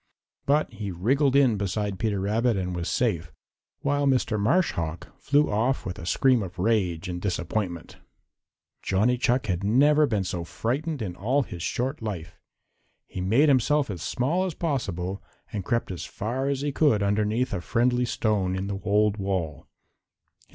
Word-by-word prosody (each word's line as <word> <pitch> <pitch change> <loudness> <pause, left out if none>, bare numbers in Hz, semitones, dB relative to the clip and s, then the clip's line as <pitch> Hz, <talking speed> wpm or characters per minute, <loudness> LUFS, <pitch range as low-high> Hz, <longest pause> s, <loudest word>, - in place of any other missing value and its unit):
But 145 -3 +2
he 105 -2 -5
wriggled 130 - +1
in 130 -6 +4
beside 100 0 -2
Peter 105 -3 0
Rabbit 110 +3 +1
and 90 -1 -2
was 85 0 -3
safe, 85 -10 0 0.5
while 145 0 +1
Mr. 125 -5 +1
Marsh 170 - +3
Hawk 85 +1 -4
flew 145 -2 +2
off 120 +6 0
with 90 -4 -5
a 85 - -7
scream 130 +4 +3
of 95 -2 -7
rage 95 -4 0
and 90 -1 -4
disappointment. 90 -2 -3 0.8
Johnny 105 +6 +2
Chuck 125 0 +1
had 90 -2 -2
never 145 +8 +4
been 105 -6 0
so 90 -2 -3
frightened 135 - -2
in 90 -4 -5
all 130 +10 +1
his 90 -7 -8
short 130 - -2
life. 90 -6 -5 0.7
He 95 - -6
made 115 +11 +4
himself 140 -1 +3
as 90 -5 -6
small 155 +9 0
as 185 -4 -3
possible 100 - -2 0.3
and 100 -3 -3
crept 120 0 -1
as 90 - -5
far 125 +6 -3
as 140 -1 -1
he 145 0 -1
could 135 -8 +3
underneath 105 +5 0
a 95 - -2
friendly 125 +5 +1
stone 105 -6 0
in 95 +1 -2
the 100 -1 -3
old 105 0 +2
wall. 95 -8 -3
105 Hz, 165 wpm, -26 LUFS, 95-130 Hz, 0.8 s, in